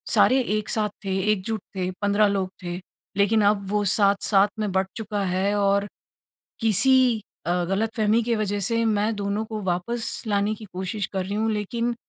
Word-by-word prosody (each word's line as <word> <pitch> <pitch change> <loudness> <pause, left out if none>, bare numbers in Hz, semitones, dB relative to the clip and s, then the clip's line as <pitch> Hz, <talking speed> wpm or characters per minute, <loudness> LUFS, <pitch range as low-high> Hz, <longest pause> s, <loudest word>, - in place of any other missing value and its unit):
सारे 260 +1 +5 0.2
एक 215 - -5
साथ 215 -1 0 0.2
थे, 190 -1 -1
एकजुट 215 +1 -2
थे 185 -1 -1
15 205 +1 +3
लोग 195 -2 -1
थे। 175 0 -4 0.4
लेकिन 210 +2 +3
अब 200 -2 -4
वो 210 0 +1
7-7 200 0 +3
में 210 -2 -1
बँट 190 0 +1
चुका 210 -2 -3
है 195 +2 +1
और 200 0 +2 0.7
किसी 225 +4 +5 0.5
अ, 175 - +1
गलतफहमी 215 +4 +1
की 235 +1 0
वजह 205 -1 -1
से 230 +3 +1
मैं 215 0 +1
दोनों 205 +1 -2
को 220 -1 -5
वापस 200 +7 -1
लाने 205 0 +1
की 215 - -11
कोशिश 190 +2 -3
कर 190 -1 -1
रही 200 +2 -4
हूँ 220 +1 0
लेकिन 230 +3 -2
205 Hz, 175 wpm, -24 LUFS, 195-220 Hz, 0.7 s, सारे